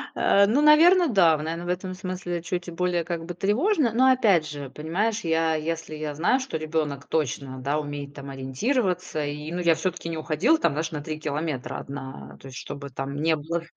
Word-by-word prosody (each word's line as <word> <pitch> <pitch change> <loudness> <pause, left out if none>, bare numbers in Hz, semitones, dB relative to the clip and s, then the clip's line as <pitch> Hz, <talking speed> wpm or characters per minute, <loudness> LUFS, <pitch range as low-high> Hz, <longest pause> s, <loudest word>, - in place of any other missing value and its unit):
А, 200 0 +4
ну, 245 +8 +2
наверно, 330 +4 +6
да, 175 -8 +5
в - - -5
наверно, 165 +2 -4
в - - -6
этом 185 +1 -2
смысле 180 -2 -4
чуть 175 0 -4
более, 175 0 0
как 170 -1 -4
бы, 175 - -5
тревожно. 245 - +2
Но 260 +2 +5
опять 200 -11 +4
же, 145 -2 -6
понимаешь, 200 +10 -1
я, 160 -1 +2
если 160 0 -3
я 150 -1 -4
знаю, 175 - +2
что 260 -12 -4
ребёнок 155 -3 -2
точно, 135 -3 -2
да, 140 +3 0
умеет 145 -1 -6
там 140 -1 -9
ориентироваться, 180 - -1
и, 150 +2 -5
ну, 180 - -2
я 165 -1 +5
всё-таки 170 +1 -3
не 160 - -3
уходила, 170 - +2
там, 165 - +2
знаешь, 155 +2 -2
даже 150 - -4
на 145 - -8
3 155 -1 -4
километра 150 -3 -3
одна, 130 - -8
то - - -10
есть, 125 - -8
что - - -6
бы 140 -1 -8
там 135 +2 -5
ни 160 +2 +2
было. 165 +3 -3
165 Hz, 215 wpm, -25 LUFS, 145-185 Hz, -, наверно